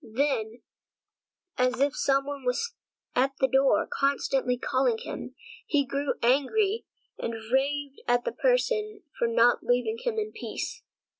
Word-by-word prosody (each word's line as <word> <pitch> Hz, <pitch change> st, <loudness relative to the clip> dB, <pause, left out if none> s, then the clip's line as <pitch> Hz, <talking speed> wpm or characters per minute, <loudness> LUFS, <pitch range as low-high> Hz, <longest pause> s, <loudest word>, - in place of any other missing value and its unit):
Then, 230 Hz, -2 st, -1 dB, 1.0 s
as 255 Hz, 0 st, +2 dB
if 285 Hz, +1 st, +2 dB
some 275 Hz, 0 st, +2 dB
one 285 Hz, -1 st, -6 dB
was 250 Hz, -, 0 dB, 0.5 s
standing 250 Hz, -, +4 dB
at -, -, -48 dB
the 265 Hz, -, +4 dB
door 265 Hz, +1 st, +3 dB
constantly 270 Hz, -2 st, 0 dB
calling 255 Hz, -2 st, +1 dB
him, -, -, -7 dB, 0.3 s
he 280 Hz, -2 st, +2 dB
grew 280 Hz, +2 st, -1 dB
angry 385 Hz, -, +2 dB, 0.3 s
and 230 Hz, -, -3 dB, 0.2 s
raved 280 Hz, +1 st, 0 dB
at 245 Hz, 0 st, +2 dB
the -, -, 0 dB
person 435 Hz, -4 st, 0 dB, 0.2 s
for 235 Hz, -, +2 dB
not 230 Hz, +1 st, +4 dB
leaving 250 Hz, -, 0 dB
him 485 Hz, -3 st, -2 dB
in 430 Hz, 0 st, -2 dB
peace. -, -, -5 dB
275 Hz, 145 wpm, -27 LUFS, 250-290 Hz, 1.0 s, standing